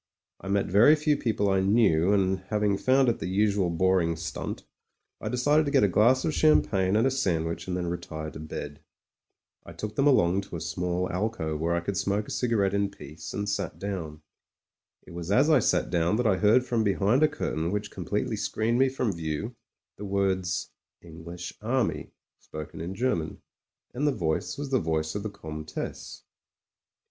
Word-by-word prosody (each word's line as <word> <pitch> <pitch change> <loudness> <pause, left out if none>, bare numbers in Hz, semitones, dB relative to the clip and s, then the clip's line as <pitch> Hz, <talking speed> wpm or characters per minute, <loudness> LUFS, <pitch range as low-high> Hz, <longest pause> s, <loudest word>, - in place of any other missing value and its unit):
I 95 - -10
met 100 0 +1
very 110 - +6
few 150 -1 +1
people 110 -6 0
I 95 - +3
knew, 95 -4 +3
and 95 -2 +2
having 105 -2 +1
found 130 +6 +3
it 120 -1 +1
the 80 - -4
usual 100 -1 +1
boring 85 -1 +2
stimt, 80 0 -5 0.6
I 110 - -3
decided 145 +6 +3
to - - -1
get 140 -5 +4
a - - +5
glass 120 - +3
of 160 - 0
champagne 100 -12 +3
and 110 +3 +3
a 135 - +3
sandwich 85 -10 -1
86 - - -21
MEN, 90 - -2
WOMEN 85 0 -2
AND 85 - -5
GUNS - - -11
and 80 - -5
then - - -4
retire 80 - -5
to - - -9
bed. 75 -1 -7 0.8
I - - -11
took 105 0 -6
them 140 +1 +3
along 95 -8 +4
to 95 -3 -9
a - - -4
small 90 +1 -2
alcove 90 -6 -2
where 85 +2 0
I 85 - 0
could 95 +2 -3
smoke 100 +3 -1
a - - -7
cigarette 105 -6 +1
in 100 0 +1
peace, 75 -4 -10
and 100 +1 -3
sat 100 - -2
down. 80 -6 -5 0.8
It - - -14
was 85 0 -6
as 135 +9 +4
I 150 - +6
sat - - +1
down 85 +3 +2
that 120 +2 0
I 100 -4 +3
heard 110 +6 +4
from 120 -3 0
behind 105 +5 +2
a 155 - +6
curtain 85 - -3
which 105 0 -3
completely - - -2
screened 115 +2 0
me 135 0 +4
from 125 -5 -1
view, 85 +8 -4 0.4
the 105 - -7
words 95 -2 -1 0.3
"English 85 +2 -8
Army" 110 - -1 0.3
spoken 75 0 -8
in 90 +4 -5
German. 95 -10 -2 0.5
And 145 +4 0
the - - +4
voice 90 - -2
was 140 -1 -5
the 130 - +3
voice 80 -2 -1
of 105 - -3
the 110 - -4
Comtesse. 75 -4 -7
100 Hz, 200 wpm, -27 LUFS, 85-115 Hz, 0.8 s, very